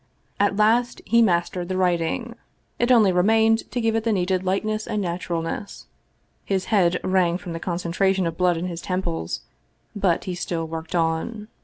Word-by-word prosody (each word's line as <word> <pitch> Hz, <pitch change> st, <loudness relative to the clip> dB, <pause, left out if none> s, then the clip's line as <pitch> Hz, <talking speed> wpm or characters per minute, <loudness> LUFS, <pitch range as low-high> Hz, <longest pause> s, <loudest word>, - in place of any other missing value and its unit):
At 205 Hz, 0 st, +2 dB
last 230 Hz, +4 st, +2 dB
he 235 Hz, 0 st, +4 dB
mastered 175 Hz, -3 st, +1 dB
the 185 Hz, -, -1 dB
writing. 180 Hz, +6 st, 0 dB, 0.5 s
It 240 Hz, +1 st, +2 dB
only 220 Hz, -6 st, +6 dB
remained 220 Hz, +5 st, +3 dB
to 250 Hz, -, -3 dB
give 225 Hz, -1 st, +1 dB
it 225 Hz, -, 0 dB
the 230 Hz, -, +1 dB
needed 185 Hz, -2 st, 0 dB
lightness 215 Hz, +3 st, -1 dB
and 215 Hz, -2 st, -1 dB
naturalness. 175 Hz, 0 st, -4 dB, 0.6 s
His 190 Hz, -2 st, -1 dB
head 180 Hz, -3 st, +3 dB
rang 185 Hz, -2 st, +2 dB
from 180 Hz, -2 st, -7 dB
the 165 Hz, -, -4 dB
concentration 185 Hz, +2 st, 0 dB
of 165 Hz, -, -2 dB
blood 180 Hz, -2 st, +2 dB
in 170 Hz, -, -3 dB
his 170 Hz, -2 st, -5 dB
temples, 80 Hz, -, -3 dB, 0.5 s
but 195 Hz, -5 st, +1 dB
he 185 Hz, -, -4 dB
still 175 Hz, -2 st, -3 dB
worked 160 Hz, +2 st, -6 dB
on. 175 Hz, +7 st, -1 dB
185 Hz, 170 wpm, -23 LUFS, 170-215 Hz, 0.6 s, only